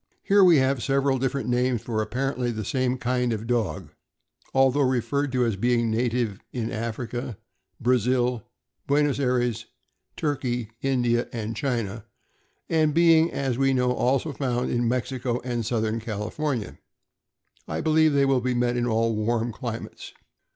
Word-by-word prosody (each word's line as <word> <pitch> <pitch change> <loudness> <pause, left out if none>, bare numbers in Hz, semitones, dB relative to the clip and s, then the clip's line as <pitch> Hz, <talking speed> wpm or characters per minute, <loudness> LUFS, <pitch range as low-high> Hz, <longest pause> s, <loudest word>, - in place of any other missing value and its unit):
Here 200 0 +5
we 175 -4 +7
have 130 -1 +2
several 135 0 +1
different 135 +1 -1
names 125 -1 +1
for 110 -2 -1
apparently 125 +3 -2
the 110 -3 -4
same 130 +1 0
kind 125 -1 0
of 110 0 -3
dog; 115 -8 -1
for, - - -32 0.6
although 135 +1 +4
referred 130 +2 0
to 125 -1 +2
as 110 -4 -1
being 120 +1 +1
native 115 -2 0
in 115 -2 -3
Africa, 115 +1 -4 0.4
Brazil, 125 0 +1 0.5
Buenos 145 0 +2
Ay 140 - +1
res, 120 -2 0 0.5
Turkey, 125 -6 -2
India, 120 -3 +1
and 115 -1 -4
China, 115 -4 -2 0.6
and 155 -2 +2
being, 165 -1 +5
as 135 -3 -2
we 135 0 +3
know, 125 -1 +2
also 135 +4 0
found 125 -3 -1
in 120 -1 +1
Mexico 125 0 -1
and 120 -2 -2
Southern 110 -1 0
California, 115 +3 -3 0.9
I - - -3
believe 155 -1 +3
they 140 -1 +4
will 135 -2 +2
be 125 0 -1
met 120 0 +1
in 120 0 0
all 115 0 +1
warm 115 +2 0
climates. 115 -1 -7
125 Hz, 150 wpm, -25 LUFS, 115-135 Hz, 0.9 s, we